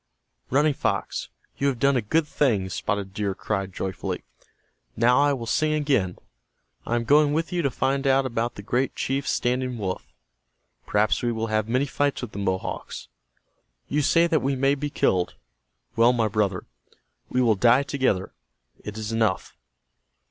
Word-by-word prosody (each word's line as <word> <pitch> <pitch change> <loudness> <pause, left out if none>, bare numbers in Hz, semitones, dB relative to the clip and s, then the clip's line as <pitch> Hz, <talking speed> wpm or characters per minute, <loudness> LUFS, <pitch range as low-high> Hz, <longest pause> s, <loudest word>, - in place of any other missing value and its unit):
"Running 145 +3 +3
Fox, - - -2 0.3
you 140 - +2
have 135 -3 0
done 140 +3 +3
a 125 - +2
good 155 +10 +1
thing," 110 -12 +1
Spotted 100 0 -3
Deer 100 -2 -2
cried, 95 -2 -3
joyfully. 95 0 -4 0.7
"Now 120 +3 +4
I 145 0 +4
will 125 -4 -3
sing 155 +6 +1
again. 135 -12 +1 0.7
I 120 - 0
am 120 - 0
going 145 +4 +4
with 165 +3 -1
you 175 - +1
to 140 - +1
find 135 +2 0
out 135 0 +3
about 120 -1 -2
the 100 - -9
great 125 +5 0
chief 135 +1 -2
Standing 125 0 0
Wolf. 95 -4 -4 0.8
Perhaps 105 +1 +2
we 120 - 0
will 115 0 -2
have 110 0 0
many 130 +4 +2
fights 145 -1 -1
with 120 - -5
the 100 - -6
Mohawks. 95 -2 -3 0.8
You 150 - +1
say 165 +4 +4
that 165 -3 +1
we 135 +1 0
may 135 +1 +2
be 145 +1 -3
killed. 90 -9 +1 0.6
Well, 115 +2 +5
my 115 -3 +1
brother, 100 -3 -1 0.6
we 125 - 0
will 120 -3 +4
die 120 +6 +4
together. 130 -9 -1 0.5
It 105 +1 -7
is 110 0 -4
enough." 110 -4 0
125 Hz, 170 wpm, -25 LUFS, 105-140 Hz, 0.8 s, Well